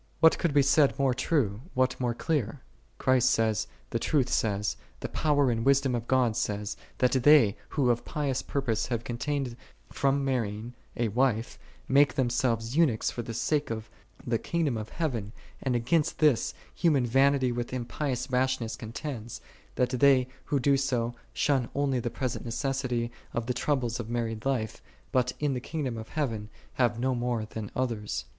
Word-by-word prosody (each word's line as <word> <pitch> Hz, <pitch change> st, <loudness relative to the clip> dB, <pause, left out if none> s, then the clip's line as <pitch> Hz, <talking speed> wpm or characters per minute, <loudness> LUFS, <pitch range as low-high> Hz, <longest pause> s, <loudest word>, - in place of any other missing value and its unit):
" -, -, -35 dB
What 160 Hz, 0 st, +6 dB
could 170 Hz, -, +1 dB
be 140 Hz, 0 st, +4 dB
said 140 Hz, +1 st, +4 dB
more 135 Hz, -2 st, +2 dB
true, 120 Hz, -5 st, 0 dB
what 130 Hz, 0 st, +1 dB
more 120 Hz, -2 st, 0 dB
clear? 140 Hz, -4 st, -1 dB, 0.4 s
Christ 130 Hz, -1 st, +3 dB
saith, 110 Hz, -4 st, +1 dB, 0.2 s
the -, -, 0 dB
Truth 140 Hz, -5 st, +1 dB
saith, 105 Hz, -1 st, 0 dB, 0.2 s
the -, -, -3 dB
Power 145 Hz, -4 st, +2 dB
and 115 Hz, -1 st, -1 dB
Wisdom 140 Hz, 0 st, +3 dB
of 120 Hz, -1 st, -2 dB
God 125 Hz, -4 st, +2 dB
saith, 105 Hz, 0 st, -2 dB, 0.2 s
that 125 Hz, -, +3 dB
they, 130 Hz, -5 st, +6 dB
who 130 Hz, -5 st, +2 dB
of 120 Hz, 0 st, -1 dB
pious 140 Hz, -4 st, -1 dB
purpose 130 Hz, -6 st, -1 dB
have 120 Hz, -2 st, -2 dB
contained 125 Hz, +1 st, -2 dB, 0.4 s
from 140 Hz, 0 st, +1 dB
marrying 115 Hz, -3 st, -2 dB, 0.2 s
a 115 Hz, -2 st, +1 dB
wife, 120 Hz, 0 st, 0 dB, 0.3 s
make 140 Hz, +2 st, +4 dB
them 125 Hz, -3 st, +1 dB
selves 115 Hz, -1 st, 0 dB
eunuchs 150 Hz, -10 st, +3 dB
for 120 Hz, -, -4 dB
the 115 Hz, -1 st, -6 dB
sake 150 Hz, +4 st, 0 dB
of 110 Hz, 0 st, -5 dB, 0.3 s
the 115 Hz, -2 st, 0 dB
kingdom 165 Hz, -7 st, 0 dB
of 110 Hz, 0 st, -5 dB
heaven: 115 Hz, -, -3 dB, 0.3 s
and 130 Hz, -2 st, 0 dB
against 140 Hz, +7 st, +1 dB
this, 150 Hz, -7 st, +3 dB, 0.2 s
human 150 Hz, -7 st, +2 dB
vanity 135 Hz, +1 st, +3 dB
with 120 Hz, 0 st, -3 dB
impious 125 Hz, +1 st, -2 dB
rashness 125 Hz, -2 st, 0 dB
contends, 115 Hz, 0 st, -6 dB, 0.4 s
that 125 Hz, -, +2 dB
they, 130 Hz, -1 st, +4 dB, 0.2 s
who 145 Hz, -, +1 dB
do 140 Hz, +2 st, +3 dB
so, 120 Hz, -3 st, 0 dB, 0.2 s
shun 135 Hz, -5 st, +1 dB
only 140 Hz, -2 st, +1 dB
the 120 Hz, -, -2 dB
present 130 Hz, 0 st, -3 dB
necessity 125 Hz, -1 st, -2 dB, 0.2 s
of 120 Hz, -, -1 dB
the 125 Hz, -, -1 dB
troubles 125 Hz, -4 st, -1 dB
of 115 Hz, -2 st, -5 dB
married 115 Hz, 0 st, -2 dB
life, 115 Hz, -6 st, -1 dB, 0.3 s
but 125 Hz, -1 st, +2 dB
in 145 Hz, -2 st, +1 dB
the 125 Hz, -, -2 dB
kingdom 140 Hz, -4 st, -3 dB
of 110 Hz, -1 st, -7 dB
heaven 115 Hz, -9 st, -2 dB, 0.2 s
have 120 Hz, -2 st, +1 dB
no 130 Hz, +1 st, +1 dB
more 120 Hz, -2 st, -1 dB
than 110 Hz, -1 st, -6 dB
others. 110 Hz, -, -2 dB
125 Hz, 175 wpm, -28 LUFS, 115-140 Hz, 0.4 s, What